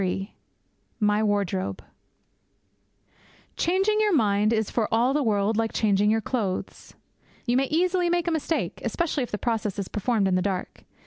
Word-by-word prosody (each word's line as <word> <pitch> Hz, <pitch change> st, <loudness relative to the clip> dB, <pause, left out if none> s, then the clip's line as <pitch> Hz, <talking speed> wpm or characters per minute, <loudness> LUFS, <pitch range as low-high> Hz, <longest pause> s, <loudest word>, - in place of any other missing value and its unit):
III 195 Hz, +2 st, -2 dB, 0.7 s
MY 210 Hz, -1 st, +2 dB
WARDROBE 200 Hz, -3 st, -1 dB, 1.8 s
Changing 390 Hz, +5 st, +1 dB
your 420 Hz, -4 st, +3 dB
mind 210 Hz, -4 st, +2 dB
is 220 Hz, -2 st, 0 dB
for 225 Hz, -3 st, -1 dB
all 240 Hz, +4 st, +3 dB
the 295 Hz, -, +1 dB
world 215 Hz, -3 st, +1 dB
like 225 Hz, 0 st, 0 dB
changing 205 Hz, -1 st, +2 dB
your 220 Hz, +1 st, +3 dB
clothes. 205 Hz, -5 st, -4 dB, 0.5 s
You 240 Hz, -, +1 dB
may 270 Hz, +1 st, +3 dB
easily 350 Hz, +4 st, +1 dB
make 345 Hz, 0 st, 0 dB
a -, -, +2 dB
mistake, 320 Hz, 0 st, -2 dB
especially 335 Hz, -5 st, -1 dB
if 245 Hz, -, -3 dB
the 210 Hz, -, -3 dB
process 220 Hz, -3 st, -2 dB
is 200 Hz, -2 st, -3 dB
performed 210 Hz, -1 st, 0 dB
in 190 Hz, -, +1 dB
the 185 Hz, -, +2 dB
dark. 185 Hz, -1 st, -4 dB
220 Hz, 165 wpm, -25 LUFS, 205-290 Hz, 1.8 s, your